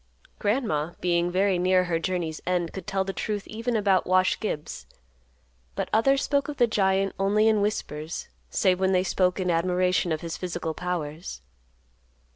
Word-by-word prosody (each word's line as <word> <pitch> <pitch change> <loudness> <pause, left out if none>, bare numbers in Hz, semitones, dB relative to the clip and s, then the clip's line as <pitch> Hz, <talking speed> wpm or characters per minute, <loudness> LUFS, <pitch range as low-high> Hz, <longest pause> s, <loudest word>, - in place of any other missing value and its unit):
Grandma, 205 - 0
being 175 -1 +1
very 190 0 +2
near 185 +1 +3
her 170 -2 -1
journey's 165 -3 -2
end, 175 -2 0
could 190 -3 -7
tell 195 -1 0
the 195 0 -4
truth 205 0 -3
even 230 +2 -3
about 195 -3 +2
Wash 185 0 +3
Gibbs, 155 -8 -4 0.9
but - - -2
others 270 +6 +3
spoke 280 -1 +1
of 290 - -5
the 240 - +5
giant 195 -3 +1
only 205 +3 +3
in 215 -2 +3
whispers, 160 -6 -3 0.2
save 185 -2 +2
when 190 0 +2
they 185 0 +3
spoke 185 0 +1
in 180 -1 +1
admiration 180 +1 +1
of 155 - -1
his 165 -1 -5
physical 175 -3 -3
powers. 165 - -4
185 Hz, 165 wpm, -26 LUFS, 175-205 Hz, 0.9 s, the